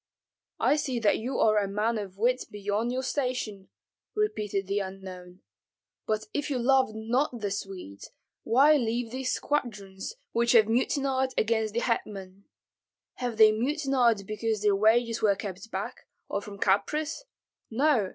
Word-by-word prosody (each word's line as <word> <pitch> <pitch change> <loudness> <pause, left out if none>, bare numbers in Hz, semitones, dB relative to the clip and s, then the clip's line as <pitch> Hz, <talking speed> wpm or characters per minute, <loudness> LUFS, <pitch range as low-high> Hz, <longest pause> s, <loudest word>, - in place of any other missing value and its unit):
"I 295 - +3
see 265 -4 -1
that 220 -3 +2
you 250 +4 -3
are 215 -1 +4
a 200 - -1
man 215 +3 0
of 195 -2 -7
wit 250 +4 +1
beyond 205 +3 -2
your 260 +1 -2
station," 250 -8 -2 0.5
repeated 210 - -1
the 200 +2 0
unknown. 190 -2 -8 0.7
"But 215 0 -1
if 290 0 -2
you 275 - 0
love 260 -2 +3
not 240 +4 0
the 205 -2 -2
Swedes, 190 - -6 0.3
why 280 +7 +5
leave 235 -2 -1
these 260 0 -2
squadrons, 205 - -3 0.2
which 235 +1 +2
have 220 -3 +6
mutinied 260 +2 +1
against 220 -1 +1
the 235 - +1
hetman? 200 -5 -3 0.7
Have 245 -3 -3
they 215 -1 +8
mutinied 250 - +1
because 215 0 -2
their 205 -1 +4
wages 230 +3 +3
were 205 -2 +4
kept 195 +1 -7
back, - - -5 0.2
or 200 - -2
from 200 0 -9
caprice? 300 - 0 0.5
No! 240 -4 +2
220 Hz, 150 wpm, -28 LUFS, 200-255 Hz, 0.7 s, they